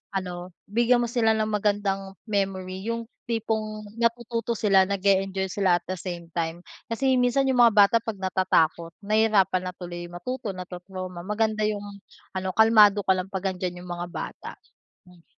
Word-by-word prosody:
ano, 180 -2 -4 0.2
bigyan 240 +2 +3
mo - - -1
sila 225 -2 +3
ng 215 0 0
magandang 200 -2 -1
memory 195 -2 -2
yung 230 0 -2 0.2
tipong 220 -2 -2 0.2
natututo 235 0 0
sila, 200 -3 +4
nag-e-enjoy 195 -1 +1
sila 190 -3 +3
at - - -43
the 185 - -1
same 175 -2 -6
time. 165 +1 -3 0.2
Kasi 260 +3 +1
minsan 250 +2 +2
yung 250 - 0
mga 235 -3 +6
bata 205 +1 +6
'pag 225 -1 -5
natatakot, 170 -3 +1
nahirapan 210 -3 +3
na 180 - -5
tuloy 175 -1 -7
matuto, 200 +6 -5
natru-trauma, 185 0 -7
maganda 215 +1 0
yung 205 -1 -2 0.5
ano, 190 0 -2
kalmado 210 -2 +6
ka 190 - +2
lang 185 0 -3
'pag 190 -1 -5
nandiyan 180 -1 -5
yung 180 - -8
mga 175 0 -4
bata. - - -6 0.6
Hmm. 180 -2 -19
200 Hz, 160 wpm, -25 LUFS, 185-220 Hz, 0.6 s, mga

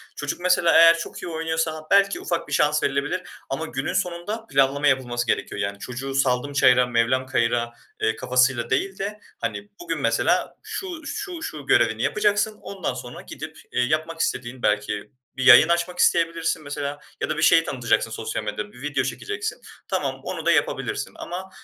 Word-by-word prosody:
Çocuk 145 +2 -4
mesela 180 -1 +3
eğer 165 0 +8
çok 165 - -7
iyi - - -4
oynuyorsa 160 -1 -2
belki 200 0 +4
ufak 170 - -2
bir - - -6
şans 150 0 +2
verilebilir 140 +6 0 0.3
ama 155 +4 -2
günün 135 -2 -3
sonunda 190 +4 -2
planlama 140 +2 +2
yapılması 120 -3 0
gerekiyor. 105 - -1
Yani 100 0 -3
çocuğu, 135 +4 -5
"Saldım 135 +1 +1
çayıra, 125 -3 +5
mevlam 125 +2 +1
kayıra.", 120 -2 0 0.3
eee, 110 0 +1
kafasıyla 125 0 +2
değil 190 +8 0
de 210 +2 -4 0.2
hani, 205 - -4
bugün, 350 - -3
mesela - - +1
şu, 385 -7 -6
şu, 380 -2 -5
şu 150 - -6
görevini 110 -3 +3
yapacaksın 210 0 +1
ondan 190 -9 -4
sonra 125 -1 -8
gidip, - - -9
eee, - - +1
yapmak 155 +5 -1
istediğin 125 -4 -2
belki 105 +2 0 0.3
bir 130 - -1
yayın 135 +5 +9
açmak 175 +1 0
isteyebilirsin 165 -1 +2
mesela 145 0 -4 0.2
ya - - -1
da 155 - -1
bir - - -1
şeyi 165 +1 +6
tanıtacaksın 120 -5 0
sosyal 110 0 -4
medyada, 105 0 -4
bir 125 - -15
video 145 -1 -1
çekeceksin. 430 0 -4 0.3
Tamam, - - -2
onu - - -5
da - - +4
yapabilirsin. - - 0
Ama 185 +2 -6
145 Hz, 170 wpm, -24 LUFS, 125-180 Hz, 0.3 s, yayın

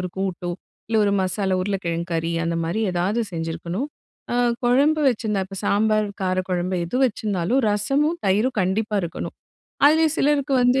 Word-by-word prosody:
ஒரு 180 - -3
கூட்டோ 185 -2 -2 0.4
இல்ல 225 - +1
ஒரு 200 - +2
மசாலா 190 0 0
உருளைக்கிழங்கு 175 -3 -2
கறி 165 0 -1
அந்த 165 0 -1
மாதிரி 175 +7 -1
ஏதாவது 185 +6 0
செஞ்சுருக்கணும். 170 - -3 0.5
அ - - 0 0.3
குழம்பு 285 +6 +3
வச்சிருந்தா 215 -4 0
இப்ப 195 0 -9
சாம்பார், 215 +1 +2
கார 185 -1 0
குழம்பு 180 +1 -1
எது 210 +9 -3
வச்சிருந்தாலும் 210 0 0
ரசமும், 275 +11 +1
தயிரும் 215 +6 +2
கண்டிப்பா 205 +3 0
இருக்கணும். 170 - -5 0.5
அதுலயும் 315 +1 +4
சிலருக்கு 280 -1 +2
வந்து 250 +2 +4
200 Hz, 150 wpm, -23 LUFS, 180-245 Hz, 0.5 s, அதுலயும்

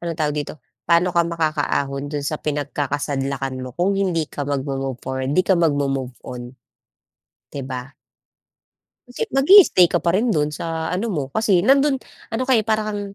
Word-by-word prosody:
anong 170 -2 -4
tawag 150 -1 0
dito, 145 +1 -4 0.3
"Pa'no 175 +1 +3
ka 170 - +3
makaka-ahon 145 -4 -1
do’n 145 -1 -4
sa 155 +1 -3
pinagkakasadlakan 140 -2 -2
mo 130 - -6
kung 185 +3 +1
hindi 175 -5 0
ka 145 -1 -6
mag-mo-move 135 -2 -3
forward, 130 0 -3
‘di 185 - +4
ka 190 - +3
mag-mo-move 135 -5 0
on? 125 +1 -8 0.9
‘Di 140 - -6
ba? 130 -1 -6 1.2
Kasi 245 - -4
mag-i-stay 270 - +7
ka 175 - -1
pa 170 - +3
rin 210 +7 +1
do'n 150 0 +1
sa 160 +1 -4
ano 190 +6 -1
mo, 160 -10 -1
kasi 195 -1 +2
nando'n 275 +4 +4 0.3
ano 230 +2 -2
ka 260 - -1
eh, - - -2
parang 215 -1 +1
kang, 205 -1 -3
150 Hz, 170 wpm, -21 LUFS, 140-185 Hz, 1.2 s, mag-i-stay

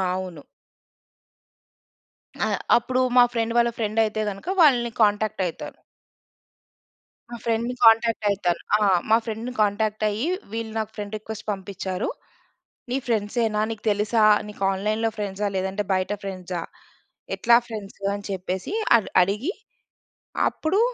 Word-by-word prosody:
అవును. 180 -5 -6 2.0
ఆ! - - -1 0.3
అప్పుడు 255 +2 0 0.2
మా 245 - +9
ఫ్రెండ్ 230 0 -1
వాళ్ళ 235 0 +4
ఫ్రెండ్ 220 0 +1
అయితే 215 0 -2
గనక, 195 - -9
వాళ్ళని 245 -6 +4
కాంటాక్టయితాను. 205 -4 0 1.5
మా 240 - -5
ఫ్రెండ్‌ని 230 +1 0
కాంటాక్ట్ 225 -1 +5
అయితాను. 185 -4 0
ఆ! - - +2 0.3
మా 220 - +6
ఫ్రెండ్‌ని 225 +2 -4
కాంటాక్ట్ 215 +1 0
అయ్యి, 220 +10 -2 0.2
వీళ్ళు 225 0 -4
నాకు 220 -1 -2
ఫ్రెండ్ 210 0 -5
రిక్వెస్ట్ 215 0 -8
పంపిచ్చారు. 190 0 -4 0.8
నీ 250 - 0
ఫ్రెండ్సేనా? 220 -1 0
నీకు 220 -2 -6
తెలుసా? 210 +2 +1 0.3
నీకు 210 -1 -10
ఆన్‌లైన్‌లో 215 +4 0
ఫ్రెండ్సా? 205 0 -2
లేదంటే 190 +2 -1
బయట 185 +2 -1
ఫ్రెండ్సా? 185 -3 -5 0.7
ఎట్లా 235 0 +5
ఫ్రెండ్సు? 205 -3 -8
అని 205 0 -7
చెప్పేసి, 185 - -3 0.2
అది 220 - -6
అడిగి, 210 - -1 1.0
అప్పుడు 355 +7 0
215 Hz, 120 wpm, -24 LUFS, 195-230 Hz, 2.0 s, మా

